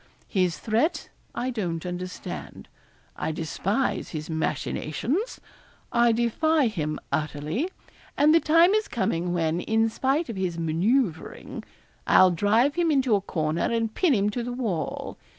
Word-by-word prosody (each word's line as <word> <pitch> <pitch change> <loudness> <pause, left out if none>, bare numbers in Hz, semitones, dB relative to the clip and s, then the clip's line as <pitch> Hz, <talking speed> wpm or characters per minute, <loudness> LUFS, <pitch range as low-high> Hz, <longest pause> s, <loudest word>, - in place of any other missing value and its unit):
His 180 -4 +1
threat 230 +9 0 0.3
I 255 +1 -1
don't 180 -8 -3
understand. 180 +1 -6 0.5
I - - -2
despise 190 - -1
his 155 0 -5
machinations. 160 - -2 0.5
I 235 0 +4
defy 245 +5 +2
him 155 -7 -3
utterly; 150 - -2 0.5
and 300 +2 +5
the 330 - +7
time 330 +4 +5
is 430 0 +1
coming 180 -5 -1
when, 165 -1 0
in 225 +2 +2
spite 270 +8 0
of 230 - -6
his 180 -3 -2
manoeuvring, 170 - -1 0.4
I'll 185 -1 +6
drive 215 - +3
him 340 +1 +1
into 265 -6 +2
a 200 - +3
corner 155 -3 -1
and 225 -1 0
pin 340 -8 +3
him 205 0 +1
to 240 - -3
the 245 +1 -4
wall. 210 - -3
215 Hz, 140 wpm, -26 LUFS, 170-260 Hz, 0.5 s, the